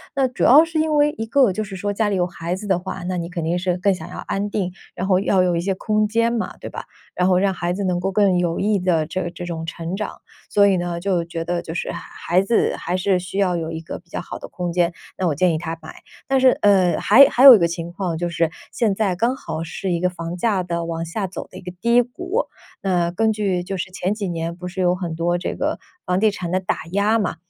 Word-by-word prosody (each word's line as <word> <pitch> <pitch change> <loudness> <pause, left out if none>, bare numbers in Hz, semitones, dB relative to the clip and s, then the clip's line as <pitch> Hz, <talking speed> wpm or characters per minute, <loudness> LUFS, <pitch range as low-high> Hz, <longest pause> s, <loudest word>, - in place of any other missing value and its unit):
那 270 -1 +3
主 250 - -4
要 295 +6 +8
是 325 -1 -2
因 310 -1 +1
为， 295 0 +4
一 225 - -3
个 245 -4 +4
就 215 - -2
是 195 -2 -8
说 205 +2 -2
家 210 +1 +1
里 200 - 0
有 180 -1 +2
孩 175 0 -4
子 200 +3 -8
的 190 -3 +1
话， 185 0 -6
那 180 +1 -2
你 170 -1 -4
肯 175 -2 -4
定 170 +3 0
是 180 0 0
更 195 +2 +2
想 185 - -8
要 - - -8
安 200 +1 -3
定， 190 -4 -2 0.2
然 185 - -3
后 185 -2 +4
要 190 -1 +2
有 180 -1 +1
一 170 - 0
些 190 +2 -1
空 215 +2 +1
间 230 +2 +1
嘛， 230 - -3
对 - - -8
吧， - - -7 0.3
然 180 - +1
后 185 -1 +4
让 195 +1 +2
孩 175 -1 -2
子 195 +3 -2
能 180 -2 0
够 190 +2 -1
更 195 -2 +3
有 170 -1 0
益 205 0 +2
地 175 -4 +1
这 175 +2 -3
这 175 +1 -8
种 165 -2 -4
成 170 +1 -4
长。 210 +2 -5 0.3
所 205 -1 +5
以 195 -2 +3
呢 175 -1 -3
就 180 -1 0
觉 165 -1 -5
得， 175 0 -1
就 165 -1 -7
是 - - -2
孩 - - -5 0.4
孩 - - +4
子 210 +4 +1
还 180 +2 -2
是 185 0 +1
需 185 +2 -7
要 190 -3 +2
有 165 -1 -3
一 160 - -4
个 165 - -7
比 175 - -29
较 - - -4
好 - - -8
的 - - -8
空 175 -1 -4
间， 175 0 +2 0.3
那 185 - +1
我 155 - 0
建 180 +3 +2
议 155 - -1
他 165 0 -4
买。 160 - -9 0.3
但 270 0 +2
是， 255 -1 +5
呃， 190 -4 +4
还 255 +7 +8
还 255 - +2
有 270 -3 +12
一 - - +3
个 170 - +3
情 170 0 -5
况， 175 -2 -3
就 175 +1 -2
是 165 -1 +1 0.2
现 220 -5 +1
在 195 -3 0
刚 235 +7 +1
好 165 -10 -5
是 180 +3 -4
一 170 - 0
个 180 +1 +1
房 170 -1 -6
价 195 -1 +1
的 170 -1 -3
往 165 0 -3
下 190 +4 -3
走 185 - -7
的 - - -11
一 - - -9
个 180 -1 -7
低 235 +3 +5
谷， 360 - -3 0.4
那 175 -3 +1
根 220 +5 +1
据 200 -4 0
就 190 +2 -4
是 180 0 -4
前 185 +1 -1
几 210 -3 -3
年 165 0 -3
不 180 +1 -7
是 180 +1 -7
有 180 0 +3
很 175 -3 -4
多 170 +1 0
这 175 - -3
个 - - -1 0.3
房 180 0 +1
地 215 +1 +3
产 180 -4 -5
的 185 - +2
打 185 - -2
压 205 +4 +2
嘛， 200 - -1
185 Hz, 300 characters per minute, -21 LUFS, 175-205 Hz, 0.4 s, 有